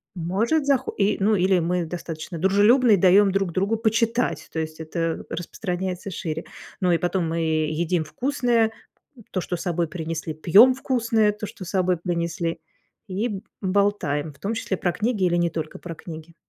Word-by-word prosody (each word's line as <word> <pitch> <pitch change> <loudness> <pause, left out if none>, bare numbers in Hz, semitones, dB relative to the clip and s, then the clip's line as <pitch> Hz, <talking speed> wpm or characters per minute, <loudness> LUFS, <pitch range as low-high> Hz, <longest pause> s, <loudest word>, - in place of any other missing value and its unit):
Может 205 - 0
захо 270 -2 +1
и, 205 +1 +2
ну, 210 +2 +3
или 185 -1 +3
мы 175 +1 0
достаточно 165 0 -6
дружелюбны 210 - +5
и - - +5
даем 195 +2 +5
друг 195 -2 0
другу 200 +5 +1
почитать, 230 +2 0
то 160 - -3
есть 160 0 -5
это 165 +1 -3
распространяется 180 +1 -4
шире. 160 -3 -4 0.4
Ну 180 -1 +3
и 170 - +4
потом 175 0 -1
мы 165 +1 -1
едим 160 +2 0
вкусное- 240 - +1 0.6
то, 185 - -1
что 175 - -3
с - - -7
собой 175 -2 -1
принесли, 160 -1 -4
пьем 195 +11 +6
вкусное- 230 -5 +1
то, 210 +1 -6
что 190 - -9
с - - -7
собой 185 -2 +1
принесли, 170 0 -2 0.5
и 200 +5 -1
б 195 -3 -5 0.2
болтаем, 185 -7 0
в 140 - -24
том 205 +7 -2
числе 215 -4 -2
про 175 -1 0
книги 215 -2 0
или 175 -1 +2
не 175 0 +2
только 155 -1 -5
про 170 - -7
книги. 160 0 -10
185 Hz, 180 wpm, -24 LUFS, 165-210 Hz, 0.6 s, пьем